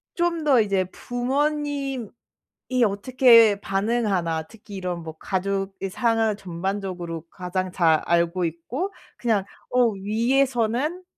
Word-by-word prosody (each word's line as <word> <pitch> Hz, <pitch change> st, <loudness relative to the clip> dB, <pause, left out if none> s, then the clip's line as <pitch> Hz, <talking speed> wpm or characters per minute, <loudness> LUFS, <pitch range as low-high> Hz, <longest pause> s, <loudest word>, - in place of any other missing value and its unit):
좀 345 Hz, -2 st, 0 dB
더 265 Hz, -6 st, +5 dB
이제 195 Hz, -3 st, +1 dB
'부모님이 275 Hz, -1 st, -2 dB, 0.8 s
어떻게 230 Hz, 0 st, +5 dB
반응하나?' 195 Hz, -6 st, 0 dB
특히 210 Hz, 0 st, -12 dB
이런 180 Hz, -2 st, -3 dB
뭐 160 Hz, -1 st, -8 dB
가족의 195 Hz, 0 st, -2 dB
상황을 225 Hz, 0 st, +1 dB
전반적으로 180 Hz, -2 st, -4 dB
가장 185 Hz, 0 st, -3 dB
잘 165 Hz, -4 st, +3 dB
알고 170 Hz, +1 st, +1 dB
있고 245 Hz, -, -4 dB, 0.2 s
그냥 220 Hz, -5 st, +1 dB, 0.3 s
어 250 Hz, -1 st, +4 dB
위에서는 240 Hz, -, 0 dB
205 Hz, 240 characters per minute, -24 LUFS, 185-250 Hz, 0.8 s, 더